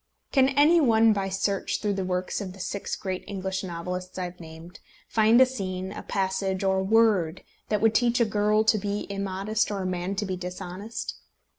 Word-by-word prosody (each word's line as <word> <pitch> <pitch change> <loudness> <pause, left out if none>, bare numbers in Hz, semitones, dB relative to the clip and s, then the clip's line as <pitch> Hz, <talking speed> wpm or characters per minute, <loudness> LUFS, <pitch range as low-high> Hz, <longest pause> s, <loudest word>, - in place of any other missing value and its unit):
Can 265 -2 +4
any 295 +5 +5
one 225 -4 +5
by 195 -1 -2
search 195 +1 -1
through 210 -1 0
the 195 -1 -2
works 185 +1 -2
of 185 -2 -6
the 195 - -14
six 200 +2 -3
great 185 -2 -4
English 190 -1 -3
novelists 180 +1 -5
I 185 - -2
have 180 0 -7
named, 165 +1 -11 0.3
find 225 +2 +4
a 260 - +8
scene, 190 -7 -4
a 210 - -7
passage, 190 0 -1
or 190 0 +2
a - - 0
word 195 -5 +2 0.3
that 210 -2 +1
would 225 0 +4
teach 245 +1 +2
a 235 - +4
girl 210 0 +2
to 220 -1 +3
be 205 +1 -3
immodest, 200 +2 -1
or 200 -2 -3
a - - -4
man 185 +1 -2
to 205 +1 -2
be 190 -1 -2
dishonest? 180 +4 -6
195 Hz, 200 wpm, -26 LUFS, 185-215 Hz, 0.3 s, a